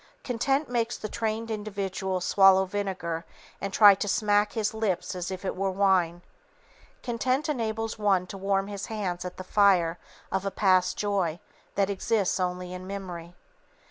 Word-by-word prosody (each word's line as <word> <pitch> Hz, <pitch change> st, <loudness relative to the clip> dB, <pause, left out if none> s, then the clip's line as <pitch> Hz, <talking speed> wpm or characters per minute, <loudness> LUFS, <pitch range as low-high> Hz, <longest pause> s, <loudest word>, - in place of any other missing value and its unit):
Content 270 Hz, +4 st, 0 dB
makes 240 Hz, -1 st, -1 dB
the 215 Hz, -, -5 dB
trained 225 Hz, +1 st, -3 dB
individual 195 Hz, -3 st, -3 dB
swallow 190 Hz, +1 st, +5 dB
vinegar 185 Hz, -4 st, -3 dB, 0.4 s
and 195 Hz, -, -3 dB
try 205 Hz, 0 st, +8 dB
to 200 Hz, +2 st, -3 dB
smack 205 Hz, +1 st, +2 dB
his 220 Hz, -2 st, -1 dB
lips 210 Hz, -6 st, -1 dB
as 180 Hz, -1 st, -4 dB
if 190 Hz, 0 st, -6 dB
it -, -, -2 dB
were 195 Hz, +1 st, 0 dB
wine. 185 Hz, -3 st, +2 dB, 0.8 s
Content 255 Hz, +5 st, 0 dB
enables 225 Hz, -5 st, -2 dB
one 195 Hz, -3 st, +2 dB
to 185 Hz, -, -9 dB
warm 195 Hz, 0 st, 0 dB
his 200 Hz, -1 st, -6 dB
hands 185 Hz, -5 st, -3 dB
at 180 Hz, -, -6 dB
the 185 Hz, -, -6 dB
fire 180 Hz, -4 st, +3 dB, 0.3 s
of 190 Hz, 0 st, 0 dB
a 200 Hz, -, -1 dB
past 185 Hz, -2 st, +2 dB
joy 190 Hz, -5 st, 0 dB, 0.4 s
that 200 Hz, 0 st, +1 dB
exists 200 Hz, 0 st, 0 dB
only 180 Hz, 0 st, -2 dB
in 180 Hz, 0 st, -7 dB
memory. 180 Hz, -3 st, -7 dB
195 Hz, 160 wpm, -27 LUFS, 185-215 Hz, 0.8 s, try